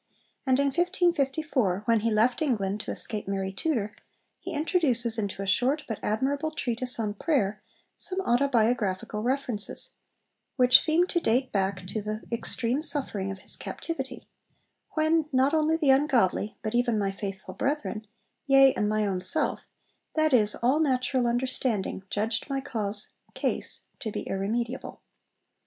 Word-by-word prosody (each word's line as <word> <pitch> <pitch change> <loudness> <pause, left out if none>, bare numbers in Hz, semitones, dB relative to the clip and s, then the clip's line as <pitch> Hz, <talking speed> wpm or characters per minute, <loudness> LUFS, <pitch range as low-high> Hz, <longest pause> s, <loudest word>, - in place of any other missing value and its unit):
And 260 -1 +4
in 280 - +3
1554, 305 - +1
when 230 -1 +3
he 230 +2 0
left 225 +5 +2
England 210 -9 0
to - - -5
escape 210 -3 -4
Mary 195 -1 -2
Tudor, 215 -3 -1 0.4
he 370 - -7
introduces 280 - +1
into 200 -2 -3
a - - -4
short 255 +9 +2
but 225 - -4
admirable 275 +8 0
treatise 250 -4 0
on 210 -2 -1
Prayer 210 -4 0 0.3
some 375 -1 -2
autobiographical 235 - +1
references, 245 -3 -2 0.6
which 250 -1 +7
seem 330 +3 +3
to 355 -1 0
date 255 -2 +1
back 190 -2 -1
to 210 +3 -3
the 215 +1 -4
extreme 235 +3 -1
suffering 280 -11 -2
of 195 -1 -6
his - - -4
captivity, 270 -7 -6 0.7
'when 315 0 +2
not 265 +2 +3
only 315 0 +2
the 295 -5 +4
ungodly, 255 -8 +2
but 215 - -2
even 240 -2 +2
my 200 -2 0
faithful 195 -1 -6
brethren, 275 -6 -2 0.4
yea, 270 -1 +7
and 210 - 0
my 215 0 +1
own 190 -2 -1
self, 185 - +2 0.6
that 310 -2 +2
is, 215 -4 +4
all 260 +6 +2
natural 255 -4 +1
understanding, 240 -5 -1
judged 220 +6 -1
my 275 0 -1
cause 215 -6 -3 0.2
(case) - - -2 0.2
to 220 -5 -4
be - - -4
irremediable.' 230 +6 -3
240 Hz, 145 wpm, -27 LUFS, 210-280 Hz, 0.7 s, which